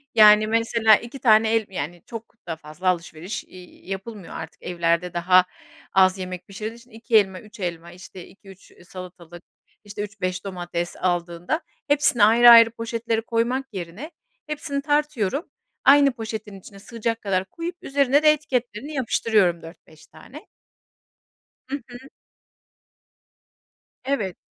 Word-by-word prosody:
Yani 215 0 +7
mesela 225 -1 +4
2 240 +5 -7
tane 220 -2 +4
el 225 -1 +2
yani 175 -1 -6
çok 230 0 -10
da 165 - -3
fazla 155 +3 -8
alışveriş, 175 +2 -2
iii, 180 0 -16
yapılmıyor 195 0 -7
artık, - - -9
evlerde 170 0 -1
daha 180 +1 +4 0.5
az 190 0 +4
yemek 185 -1 -7
pişirdiği 215 +4 -7
için 245 +1 -19
2 225 0 +1
elma 190 -3 +1
3 210 -1 -16
elma, 170 -1 -5
işte 180 0 -12
2-3 195 -1 -17 0.2
salatalık, 175 -2 -11 0.4
işte 205 0 -7
3-5 190 -2 -4
domates 175 -2 -4
aldığında 175 - -2 0.3
hepsini 290 -6 +4
ayrı 235 +3 +7
ayrı 230 -1 +9
poşetleri 230 0 -3
koymak 235 +4 -1
yerine 190 - -7 0.4
hepsini 290 -2 -3
tartıyorum 290 - -1 0.4
aynı 280 0 +6
poşetin 220 -4 -7
içine 195 +1 -14
sığacak 230 +1 -4
kadar 190 -2 -1
koyup 335 - -6
üzerine 280 -1 +2
de 305 - +7
etiketlerini 265 -2 -3
yapıştırıyorum 215 - +1
4-5 160 -1 -15
tane. 250 - -14 1.2
Hı 275 - -2
hı. 245 -1 -10 2.1
Evet. 215 -10 -2
210 Hz, 130 wpm, -23 LUFS, 180-235 Hz, 2.1 s, ayrı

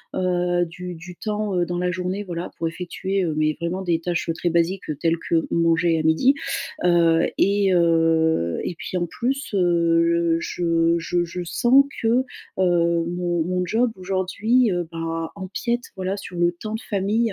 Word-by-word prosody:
heu, 175 -1 +1
du 180 +1 -7
du 175 +1 -11
temps, 210 -2 -2
heu, 175 - +2
dans 175 0 -3
la 180 0 0
journée, 185 +3 -3
voilà 175 -2 -5
pour 165 - -1
effectuer, 185 +3 -3
mais 155 0 +1
vraiment, 175 +3 -2
des 170 -3 0
tâches, 175 0 -2
heu, 165 - +2
très 175 +1 -1
basiques, 170 +2 0
heu, 150 - -1
telles 165 +2 +1
que 165 -1 +2
manger 165 0 +2
à - - -1
midi. 160 - +4 0.5
Heu 170 -2 +4
et 200 -1 +3
heu 165 - +2
et 175 - -3
puis 180 - -6
en 175 - 0
plus, 260 +7 -3
heu, 170 -2 +2
je 165 -1 +1
je 175 +1 0
je 175 +1 -6
sens 250 +10 +4 0.2
que, 225 - 0
heu, 245 +3 +3 0.3
mon 175 -1 +1
mon 180 +1 -1
job 230 +5 +1
aujourd'hui, 195 +5 +1
heu, 175 -2 -2
bah, 165 0 -3
empiète 235 +6 -3
voilà 190 +1 -2
sur 180 -3 -8
le 175 0 +2
temps 215 +5 -6
de - - -4
famille, 200 +1 -1
175 Hz, 175 wpm, -23 LUFS, 165-190 Hz, 0.5 s, midi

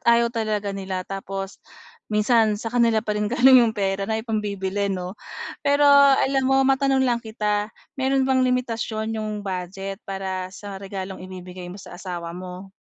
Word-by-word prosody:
ayaw 235 0 +4
talaga 215 -3 -1
nila 190 -2 -4
tapos 195 0 -6 0.5
minsan, 215 0 +3
sa 225 +2 -5
kanila 230 -2 +3
pa 210 - -1
rin 210 - 0
galing 250 +1 +7
'yong 225 -2 +1
pera 195 0 -1
na 220 - +1
ipambibili, 205 -3 -2
'no? 185 -1 -3 0.5
Pero 285 +1 +3 0.3
alam 270 0 +2
mo, 270 0 +4
matanong 270 0 +3
lang 240 -2 +1
kita, 210 -2 -1 0.3
meron 265 0 +2
bang 260 0 +3
limitasyon 230 -3 -1
'yong 215 -1 -4
budget 195 +1 -5
para 190 -1 -3
sa 195 0 -8
regalong 190 -1 -6
ibibigay 180 -1 -8
mo 185 - -8
sa 200 - -11
asawa 170 -3 -5
mo? 185 +2 -8
210 Hz, 160 wpm, -23 LUFS, 190-235 Hz, 0.5 s, galing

